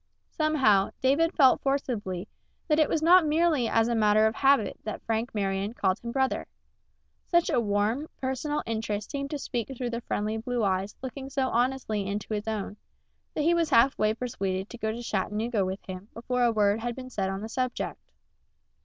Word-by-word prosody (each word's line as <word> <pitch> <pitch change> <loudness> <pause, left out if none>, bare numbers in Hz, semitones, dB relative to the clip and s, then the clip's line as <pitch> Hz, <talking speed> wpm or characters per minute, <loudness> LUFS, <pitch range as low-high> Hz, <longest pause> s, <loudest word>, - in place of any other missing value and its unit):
Somehow, 265 -11 +3
David 285 +6 +3
felt 265 -5 +5
forcibly 220 -9 -2 0.4
that 305 -2 +3
it 310 - +4
was 315 - 0
not 355 +2 +7
merely 310 -4 +2
as 225 0 +2
a 240 - 0
matter 215 -1 +4
of 220 - +2
habit 270 -2 +2
that 215 - -5
Frank 225 +1 -2
Marion 200 +2 -1
called 185 -5 +1
him 235 - -6
brother. 265 +1 0 0.8
Such 345 -1 +2
a - - +3
warm, 215 +7 0
personal 265 +3 -2
interest 215 -2 -3
seemed 280 0 -3
to 295 - -3
speak 240 -4 -3
through 245 -1 -3
the 235 0 -3
friendly 215 0 -2
blue 240 +1 -2
eyes 190 0 0
looking 265 +1 -6
so 265 -2 0
honestly 235 -4 0
into 205 +2 -3
his 210 +1 -3
own, 210 -1 -3 0.6
that 300 - 0
he 335 +3 +4
was 335 -2 +1
half 265 0 +5
way 215 +1 +1
persuaded 195 -6 -3
to 240 - -8
go 220 -2 -1
to 235 +2 -6
Chattanooga 210 +1 -1
with 190 +1 -4
him 185 +1 -7
before 250 +2 -2
a 235 - +4
word 210 -1 +2
had 240 +1 -3
been 255 -1 -8
said 195 -4 -1
on 195 +1 -4
the 220 - -5
subject. 255 0 -3
235 Hz, 190 wpm, -27 LUFS, 210-265 Hz, 0.8 s, not